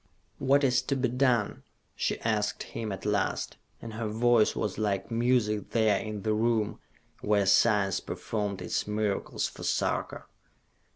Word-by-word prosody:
"What 140 +2 +3
is 130 -1 +3
to 140 - -1
be 130 -2 0
done?" 125 -4 +1 0.3
she - - -1
asked 105 -2 0
him 110 -2 -5
at 95 - -6
last, 105 -2 -1 0.3
and 115 -1 -7
her 110 0 -3
voice 115 +1 +3
was 105 0 -2
like 100 -2 -1
music 115 -3 +1
there 110 -3 +2
in 105 -2 -5
the 110 - +1
room 110 -1 0 0.4
where 105 -1 +2
science 100 -1 +3
performed 105 -3 -4
its - - -2
miracles 105 -1 -1
for - - -12
Sarka. - - -1
110 Hz, 150 wpm, -29 LUFS, 105-120 Hz, 0.4 s, What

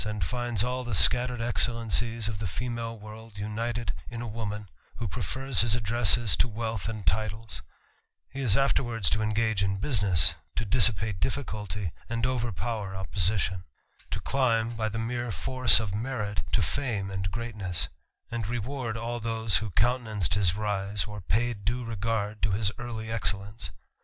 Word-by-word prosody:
<i 105 -1 -3
finds 120 +4 0
all 125 +1 -2
the 120 -4 -2
scattered 125 - +6
excellencies 115 -1 +2
of 105 -3 -3
the 105 - -2
female 115 +2 -4
worL<i 110 0 -11
united 110 0 -2 0.2
in 120 - -6
a 120 - -4
woman, 105 -2 -5 0.3
who 115 - -3
prefers 125 +5 0
his 115 0 +4
addresses 115 -1 +4
to - - +3
wealth 110 -2 -3
and 110 -3 -6
titles; 105 - -1 0.7
he 140 - -5
is 115 -5 +5
afterwards 120 - +1
to 110 - +1
engage 110 -1 +1
in 100 0 0
business^ 100 - +3 0.2
to 115 - -1
dissipate 105 -3 +3
difficulty, 105 - -2 0.2
and 115 0 -1
overpower 115 -4 -2
opposition; 95 -1 0 0.5
to - - -3
climb^ 115 -4 +1
by 110 -1 -1
the 110 - -5
mere 120 +2 -2
force 120 +8 +5
of 105 -4 -3
merit, 105 - -2
to 70 - +3
fame 110 -9 -2
and 95 0 -2
greatness; 105 -6 -1 0.4
and 115 -3 -2
reward 120 0 -3
all 120 +1 -3
those 115 -1 +1
who 110 - -3
countenanced 110 - +1
his 95 -4 +3
rise, 100 -1 0
or 105 -1 -7
paid 110 +2 -1
due 120 +4 -1
regard 110 -1 -2
to - - +2
his 100 0 +1
early 110 -2 -5
excellence. 100 -4 -1
110 Hz, 155 wpm, -28 LUFS, 100-120 Hz, 0.7 s, scattered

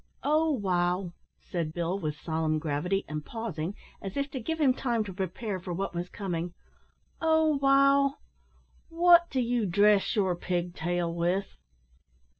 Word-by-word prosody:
"O 310 +2 +3
wow!" 180 - 0 0.3
said 165 -3 -4
Bill, 175 +3 -1
with 155 -5 -3
solemn 160 -1 -1
gravity, 160 +6 -1
and 150 -1 -4
pausing, 200 -5 -4 0.3
as 195 +3 -6
if 280 0 -1
to 260 - -4
give 320 +7 -3
him 275 -4 +4
time 240 -4 0
to 195 -3 -7
prepare 190 +2 -3
for 180 0 -5
what 195 +2 -3
was 175 +1 -4
coming. 175 -4 -4 0.7
"O 320 -2 +3
wow! 275 0 +4 0.7
wot 345 +1 +5
do 265 - -1
you 240 -3 +1
dress 205 +4 +3
your 190 -4 +2
pig 175 0 -2
tail 175 0 -1
with?" 175 +3 -1
195 Hz, 150 wpm, -28 LUFS, 175-265 Hz, 0.7 s, wot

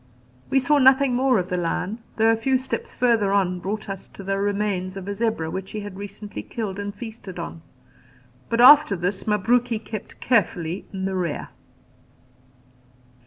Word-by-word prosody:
We - - +2
saw 285 +3 +3
nothing 265 0 +5
more 255 0 +3
of 180 -1 -2
the 180 - -1
lion, 180 +5 -2 0.2
though 225 0 +4
a - - +3
few 260 +4 +1
steps 260 +1 -4
further 230 -5 +2
on 185 -3 +1
brought 210 +4 -4
us 195 -1 -6
to 195 - -12
the 195 +1 -1
remains 200 -2 -1
of 195 0 -7
a 200 - -2
zebra 200 -7 -1
which 190 0 -5
he 215 - -5
had 205 -2 -8
recently 205 +1 -7
killed 205 -4 -5
and 205 0 -3
feasted 210 -3 -9
on; 170 -1 -6 0.9
but 230 - 0
after 290 -2 +8
this 185 +4 -3
Mabruki 230 +3 +2
kept 215 -1 -8
carefully 185 -7 0
in 190 -1 -4
the 195 - -2
rear. 175 -5 -2
205 Hz, 170 wpm, -23 LUFS, 190-235 Hz, 0.9 s, after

